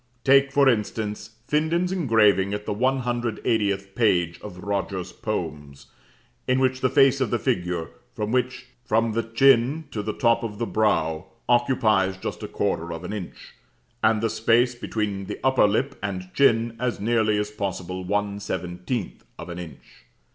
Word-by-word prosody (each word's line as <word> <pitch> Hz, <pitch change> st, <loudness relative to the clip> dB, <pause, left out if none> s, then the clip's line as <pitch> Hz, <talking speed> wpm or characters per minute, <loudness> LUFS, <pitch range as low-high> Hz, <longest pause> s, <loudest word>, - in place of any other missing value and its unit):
Take, 140 Hz, +1 st, +5 dB
for 140 Hz, -1 st, +4 dB
instance, 105 Hz, -2 st, -1 dB, 0.2 s
Finden's 165 Hz, +4 st, +1 dB
engraving 110 Hz, -, +3 dB
at 105 Hz, 0 st, -6 dB
the -, -, -2 dB
180th 120 Hz, -5 st, 0 dB
page 90 Hz, -7 st, +1 dB
of 90 Hz, -3 st, -9 dB
Rogers' 95 Hz, -3 st, -3 dB
poems; 75 Hz, -9 st, -5 dB, 0.6 s
in 130 Hz, -, +3 dB
which 130 Hz, 0 st, +1 dB
the 130 Hz, -, +3 dB
face 135 Hz, +1 st, +4 dB
of 130 Hz, -, +1 dB
the 120 Hz, -, +1 dB
figure, 90 Hz, -10 st, -2 dB, 0.2 s
from 105 Hz, 0 st, -3 dB, 0.8 s
the 115 Hz, +2 st, 0 dB
chin 135 Hz, +5 st, +3 dB
to 105 Hz, -, -3 dB
the 105 Hz, +1 st, -3 dB
top 115 Hz, -2 st, +2 dB
of 110 Hz, -3 st, -5 dB
the 115 Hz, -, -1 dB
brow, 80 Hz, -9 st, 0 dB, 0.2 s
occupies 110 Hz, -6 st, +2 dB
just -, -, -5 dB
a -, -, -4 dB
quarter 85 Hz, +1 st, -2 dB
of 85 Hz, +1 st, -6 dB
an 90 Hz, -, -5 dB
inch, 100 Hz, -5 st, -8 dB, 0.5 s
and 110 Hz, -1 st, +3 dB
the 115 Hz, -, +2 dB
space 120 Hz, +2 st, +3 dB
between 105 Hz, -4 st, -3 dB
the -, -, -6 dB
upper 130 Hz, -5 st, +4 dB
lip 120 Hz, +7 st, 0 dB
and 95 Hz, -2 st, -5 dB
chin 115 Hz, -4 st, +3 dB
as 125 Hz, -3 st, -1 dB
nearly 110 Hz, -1 st, +2 dB
as 105 Hz, 0 st, -2 dB
possible 95 Hz, -3 st, -4 dB
one 100 Hz, +1 st, -1 dB
seventeenth 90 Hz, +3 st, -4 dB
of 85 Hz, -, -8 dB
an 85 Hz, 0 st, -6 dB
inch. 80 Hz, -6 st, -12 dB
105 Hz, 155 wpm, -24 LUFS, 95-120 Hz, 0.8 s, Take